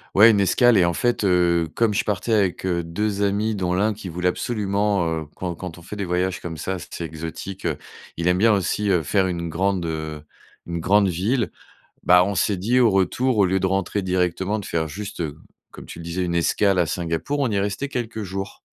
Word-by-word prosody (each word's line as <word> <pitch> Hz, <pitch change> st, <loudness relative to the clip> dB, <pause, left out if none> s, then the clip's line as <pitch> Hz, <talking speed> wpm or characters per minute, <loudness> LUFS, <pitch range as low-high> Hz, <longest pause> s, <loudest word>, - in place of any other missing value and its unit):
ouais, 110 Hz, +4 st, +8 dB
une 105 Hz, -, +2 dB
escale, 115 Hz, +4 st, +4 dB
et 90 Hz, -, +5 dB
en 85 Hz, -, +1 dB
fait, 120 Hz, +4 st, 0 dB
heu, 85 Hz, -3 st, +3 dB
comme 115 Hz, -2 st, +2 dB
je -, -, +1 dB
partais 105 Hz, +2 st, -1 dB
avec, 95 Hz, -4 st, +1 dB
heu, 85 Hz, -2 st, 0 dB
2 100 Hz, +4 st, -2 dB
amis 105 Hz, +2 st, +1 dB
dont 90 Hz, -3 st, -1 dB
l'un 105 Hz, +4 st, +2 dB
qui 100 Hz, -2 st, -8 dB
voulait 90 Hz, +2 st, 0 dB
absolument, 100 Hz, -2 st, 0 dB, 0.2 s
heu, -, -, -7 dB
quand 90 Hz, -2 st, -4 dB
quand 90 Hz, -1 st, -7 dB
on -, -, -12 dB
fait 90 Hz, -, -8 dB
des 100 Hz, -1 st, -3 dB
voyages 90 Hz, +1 st, -1 dB
comme 80 Hz, -2 st, -6 dB
ça, 90 Hz, +5 st, -3 dB
assez 85 Hz, -1 st, -7 dB
exotiques, 80 Hz, +4 st, -7 dB
heu, 80 Hz, -4 st, 0 dB, 0.4 s
il 85 Hz, -, -1 dB
aime 90 Hz, 0 st, +3 dB
bien 110 Hz, +1 st, +5 dB
aussi, 100 Hz, +2 st, 0 dB
heu, 90 Hz, -4 st, +2 dB
faire 95 Hz, +4 st, +1 dB
une 85 Hz, -2 st, -3 dB
grande, 95 Hz, +1 st, 0 dB
heu, 80 Hz, -1 st, -4 dB, 0.4 s
une 85 Hz, 0 st, -4 dB
grande 100 Hz, +4 st, +3 dB
ville. 100 Hz, +5 st, 0 dB, 0.5 s
Bah, 90 Hz, 0 st, +6 dB
on 100 Hz, +1 st, -2 dB
s'est 100 Hz, +2 st, +1 dB
dit 115 Hz, +8 st, +2 dB
au 120 Hz, -2 st, +5 dB
retour, 110 Hz, +6 st, +1 dB
au 100 Hz, -, +5 dB
lieu 95 Hz, +1 st, +1 dB
de 95 Hz, -, 0 dB
rentrer 95 Hz, +1 st, -1 dB
directement, 95 Hz, +3 st, 0 dB
de 100 Hz, -, -8 dB
faire 80 Hz, -1 st, -1 dB
juste, 100 Hz, +1 st, -5 dB, 0.5 s
comme -, -, -11 dB
tu -, -, -10 dB
le -, -, -8 dB
disais, 85 Hz, +2 st, -2 dB
une 85 Hz, -1 st, -2 dB
escale 95 Hz, +3 st, +2 dB
à 85 Hz, -, +3 dB
Singapour, 85 Hz, -, -2 dB
on 135 Hz, -3 st, +1 dB
y 100 Hz, -2 st, 0 dB
restait 100 Hz, +8 st, -2 dB
quelques 115 Hz, -4 st, -4 dB
jours. 95 Hz, +1 st, -6 dB
95 Hz, 225 wpm, -23 LUFS, 85-105 Hz, 0.5 s, ouais